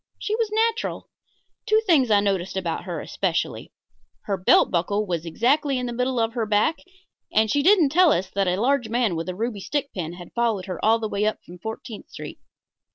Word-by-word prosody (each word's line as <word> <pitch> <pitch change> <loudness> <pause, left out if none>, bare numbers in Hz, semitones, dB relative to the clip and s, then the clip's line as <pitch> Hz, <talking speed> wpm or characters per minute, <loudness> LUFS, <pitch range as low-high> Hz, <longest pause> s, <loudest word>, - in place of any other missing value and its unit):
She 430 - -2
was 450 -1 0
natural. 450 +1 -1 0.6
Two 435 0 +4
things 295 - +4
I 205 -1 +5
noticed 195 -2 -1
about 175 -3 -3
her - - -4
especially. - - -2 0.5
Her 200 - -2
belt 185 -1 +4
buckle 200 +5 0
was 170 -3 -3
exactly 270 - +1
in 250 - -2
the 240 - -4
middle 250 +1 -1
of 225 0 0
her 230 -3 -2
back, 210 +10 +2 0.5
and 220 0 +2
she 285 - +2
didn't 350 -2 +5
tell 345 +2 +5
us 185 -4 +1
that 195 -1 0
a 180 +1 0
large 245 0 +1
man 230 -5 +1
with 165 +2 -4
a 180 - -4
ruby 220 +1 -3
stick 285 +7 -3
pin 170 -3 -4
had 175 -1 -11
followed 230 -6 0
her 185 -4 -6
up 215 - +4
all 225 - +5
the 225 -1 -3
way 210 +1 +1
from 175 +1 -12
Fourteenth 220 +3 -7
Street. - - -9
220 Hz, 210 wpm, -24 LUFS, 190-275 Hz, 0.6 s, I